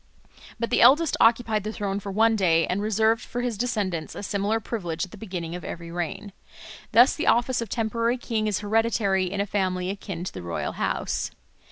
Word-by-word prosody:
But 235 - -2
the - - +3
eldest 285 +7 +6
occupied 225 -2 +3
the 215 - -3
throne 200 -2 -3
for 200 0 -6
one 225 +3 +3
day, 165 -5 +3
and 185 +3 -1
reserved 220 +2 +2
for 245 - -4
his 245 -2 -1
descendants 200 -8 -2
a - - -6
similar 205 +2 0
privilege 175 -7 -3
at 185 - -18
the - - -10
beginning 180 -6 -5
of 180 - -6
every 170 0 -7
reign. 175 +4 -4 0.6
Thus 240 +4 +6
the 320 - -3
office 240 +1 +3
of 230 - -5
temporary 230 +2 0
king 225 -3 -2
is 210 -2 -1
hereditary 205 -3 +1
in 200 - -3
a 200 - +1
family 185 -2 -1
akin 195 -3 -6
to 185 - -5
the 95 - -7
royal 85 -1 -3
house. - - -2
205 Hz, 200 wpm, -25 LUFS, 185-230 Hz, 0.6 s, eldest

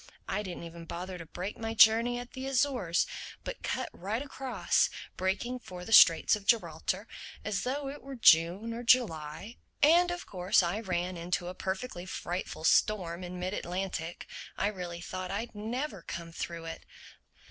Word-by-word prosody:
I 210 - -1
didn't 185 -4 -6
even 170 0 -9
bother 180 +2 -6
to 165 - -9
break 185 +5 -5
my 225 0 -3
journey 230 +2 +6
at 245 0 -8
the 260 0 -5
Azores, 255 -10 +2 0.4
but - - -6
cut - - -2
right 215 +8 -3
across, 270 -2 +1 0.3
making 225 +7 -1
for 180 -6 -9
the 225 - -2
Straits 165 -2 +8
of 200 -2 -10
Gibraltar—as 195 +1 -1
though 275 +3 -2
it 280 +2 -7
were 275 0 -8
June 190 +1 +5
or 235 - -5
July. 210 -5 +1 0.3
And 345 +4 +6
of 350 0 -4
course 185 0 +2
I 175 +5 -1
ran 180 -3 -2
into 175 +1 -2
a - - -5
perfectly 190 0 -4
frightful 175 -2 -4
storm 180 -1 +2
in 180 0 -6
mid 185 +2 -2
Atlantic. 175 -3 -4 0.3
I 200 - +1
really 175 -4 -6
thought 185 +1 -5
I'd 215 +5 -3
never 220 - -4
come 165 0 -7
through 165 0 -5
it. 165 0 -7
190 Hz, 165 wpm, -30 LUFS, 175-235 Hz, 0.4 s, Straits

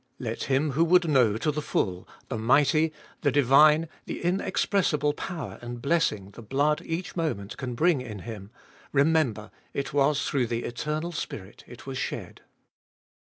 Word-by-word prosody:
Let - - -4
him 140 +2 +1
who 155 +5 +2
would 180 0 +4
know 125 -8 +3
to 150 - 0
the 150 +1 -3
full 90 -9 -2 0.2
the 125 - -4
mighty, 145 +7 +3 0.3
the 145 - +2
divine, 150 +4 +5 0.2
the - - -5
inexpressible 175 -4 +1
power 160 -3 -6
and 120 0 -6
blessing 120 - 0
the 115 - -11
blood 140 +7 +1
each 165 +3 -4
moment 135 - -2
can 125 -3 -5
bring 160 0 +3
in 110 -5 -7
Him, 105 -3 -8 0.4
remember, 140 -7 +2 0.2
it 140 -1 -3
was 140 0 +2
through 130 -5 +1
the 115 0 -2
Eternal 150 +7 -3
Spirit 105 - -7
it 120 - -12
was 135 -1 -4
shed. - - -5
140 Hz, 160 wpm, -27 LUFS, 120-155 Hz, 0.4 s, divine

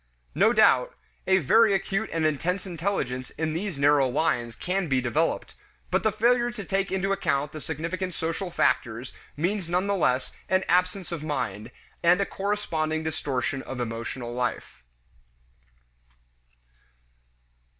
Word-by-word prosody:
No - - +4
doubt, - - +4 0.3
a 190 0 +5
very 205 - +5
acute 195 +3 -1
and 165 -1 0
intense 170 +6 0
intelligence 170 -9 -2
in 155 0 -1
these 180 -1 -3
narrow 140 -1 +4
lines 120 -4 0
can 185 0 -1
be 135 -3 +2
developed, 140 +7 0 0.4
but - - +2
the 220 - +2
failure 240 +3 +3
to 225 -5 -7
take 195 +2 -1
into 190 +1 0
account 145 -6 0
the 155 - -7
significant 170 +4 -3
social 165 +3 -2
factors 120 -7 0 0.2
means 180 +2 -1
none 180 +2 +1
the 200 - +1
less 130 -9 +1 0.2
an 190 0 +3
absence 180 0 +1
of 170 -3 -4
mind, 110 -8 -3 0.3
and 175 +2 +5
a 200 - +2
corresponding 160 -7 -2
distortion 140 -3 -2
of 130 -1 -7
emotional 120 +1 -4
life. 120 - -3
165 Hz, 140 wpm, -26 LUFS, 135-195 Hz, 0.4 s, a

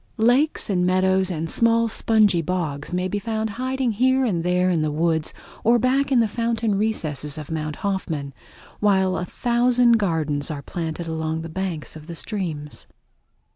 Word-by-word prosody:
Lakes 245 +7 +2
and 185 -3 +1
meadows 190 +1 +2
and 165 -2 -3
small 230 +5 +3
spongy 215 -5 +3
bogs 160 -4 -3
may 180 +1 -1
be 205 +2 -2
found 220 +1 -2
hiding 255 +2 -1
here 260 +4 +2
and 175 -8 0
there 180 +1 +2
in 165 -3 +1
the 155 - 0
woods 160 +1 0 0.3
or 235 +2 +5
back 265 +4 +1
in 250 -3 +5
the 225 - +2
fountain 230 0 -1
recesses 155 -9 -1
of 155 0 -7
Mount 155 -1 -3
Hoffman, 160 -8 -2 0.5
while 190 -3 +2
a 180 - -2
thousand 240 +2 +3
gardens 155 -7 -1
are 145 -3 -5
planted 165 +1 -4
along 160 0 -2
the 165 - -7
banks 175 -3 -4
of 155 0 -11
the 170 - -7
streams. 165 -7 -4
185 Hz, 170 wpm, -23 LUFS, 160-230 Hz, 0.5 s, or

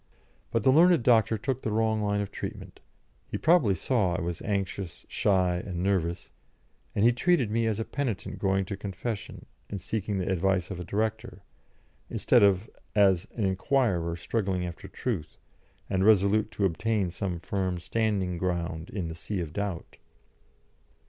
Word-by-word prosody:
But 115 - 0
the 130 - +6
learned 170 -1 +5
doctor 110 -2 +4
took 130 +4 -2
the - - -2
wrong 110 0 +1
line 105 0 0
of 100 - -4
treatment; - - -7 0.5
he - - -2
probably 155 - +4
saw 95 -2 +1
I 90 - -2
was 85 0 -3
anxious, 95 -3 -3
shy, 90 -3 +2
and 90 -1 -4
nervous, 90 -3 -1 0.6
and 100 - +3
he 120 - +7
treated 125 - +2
me 115 +1 +1
as 110 -1 -1
a 110 - -2
penitent 130 -8 -3
going 95 -1 +1
to 100 - -4
confession 100 +2 -5 0.2
and 100 - -4
seeking 105 +2 -2
the 95 0 -1
advice 95 0 +1
of 95 - -5
a - - -4
director, 110 +1 -3 0.7
instead - - +3
of 100 0 +4 0.3
as 95 -4 +4
an 110 - 0
inquirer 95 -4 +1
struggling 95 0 -1
after 85 -1 -7
truth, 100 -12 -4 0.5
and 95 -1 0
resolute 105 +1 +4
to 100 - +1
obtain 95 +1 0
some 90 -1 -3
firm 95 0 -2
standing 95 -2 -1
ground 85 -2 -2
in 95 -5 -3
the 80 - -5
sea 90 +4 -4
of 80 -3 -4
doubt. 100 -4 -4
100 Hz, 160 wpm, -28 LUFS, 90-110 Hz, 0.7 s, he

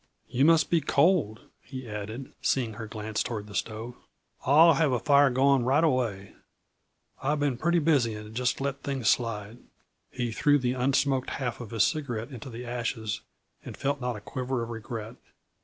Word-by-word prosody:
"You 135 +3 +2
must 165 -1 +4
be 170 -2 +4
cold," 140 - +2 0.2
he 130 -2 -8
added, 110 +4 -6
seeing 120 -5 0
her 110 +1 -7
glance 110 0 -3
toward 110 -4 -3
the 105 - -12
stove. 115 +3 -4 0.5
"I'll 160 +5 +7
have 150 -1 +2
a 125 - +2
fire 140 +3 +5
going 135 +1 +3
right 135 +6 +3
away; 115 - 0 0.9
I've 145 +2 0
been 145 -3 +1
pretty 170 +7 +1
busy 145 -9 +2
and 105 0 -9
just 125 +1 0
let 140 0 -3
things 135 -5 0
slide." 115 -1 -2 0.5
He 120 -2 -3
threw 145 +6 +3
the 125 -2 0
un 130 +2 0
smoked 135 -1 +1
half 125 -3 -3
of 115 - -8
his 115 -3 +2
cigarette 130 -5 -2
into 125 0 -8
the 120 +1 -7
ashes 115 -2 -3 0.4
and - - -9
felt 140 0 -1
not 125 -1 -2
a 105 - -8
quiver 125 +2 -3
of 115 - -6
regret. 115 0 -6
125 Hz, 180 wpm, -28 LUFS, 115-140 Hz, 0.9 s, I'll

